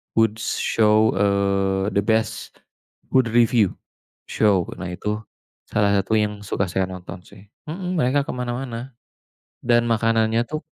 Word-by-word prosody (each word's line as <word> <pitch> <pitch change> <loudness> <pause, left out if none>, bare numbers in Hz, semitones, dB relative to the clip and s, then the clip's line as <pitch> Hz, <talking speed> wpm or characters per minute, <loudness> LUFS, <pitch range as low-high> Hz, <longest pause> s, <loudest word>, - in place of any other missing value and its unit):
good 110 -1 +2
show, 110 0 +2
eee, 100 0 +1
the 100 - +1
best, 110 +2 -1 0.6
food 130 -2 +4
review, 115 -4 +3 0.5
show 100 -5 +2 0.2
nah 90 -1 -5
itu 105 +4 -3 0.5
salah 105 -1 +2
satu 100 +3 0
yang 105 -1 -1
suka 100 0 -1
saya 95 0 0
nonton 90 -1 -8
sih, 100 +1 -16 0.2
mhm, 180 +2 -4
mereka 135 +2 +2
kemana-mana, 125 0 -5 0.7
dan 120 -1 +3
makanannya 115 0 +2
tuh, 155 0 -3
110 Hz, 130 wpm, -22 LUFS, 100-120 Hz, 0.7 s, food